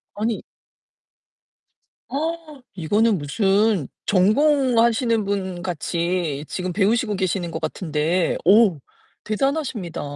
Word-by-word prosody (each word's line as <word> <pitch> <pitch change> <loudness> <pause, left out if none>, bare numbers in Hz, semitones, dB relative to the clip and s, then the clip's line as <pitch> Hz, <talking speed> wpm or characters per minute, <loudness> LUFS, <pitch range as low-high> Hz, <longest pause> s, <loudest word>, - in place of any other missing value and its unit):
아니 215 +2 -2 1.7
어 310 0 -4
이거는 205 +5 +1
무슨 195 - +1 0.2
전공하시는 230 +1 +3
분 190 -3 -3
같이 170 -3 -2
지금 185 -1 -4
배우시고 210 +3 +1
계시는 185 -2 -2
것 - - -4
같은데 160 +1 -1
오 200 -4 +5 0.5
대단하십니다. 230 - -2
200 Hz, 215 characters per minute, -22 LUFS, 175-230 Hz, 1.7 s, 오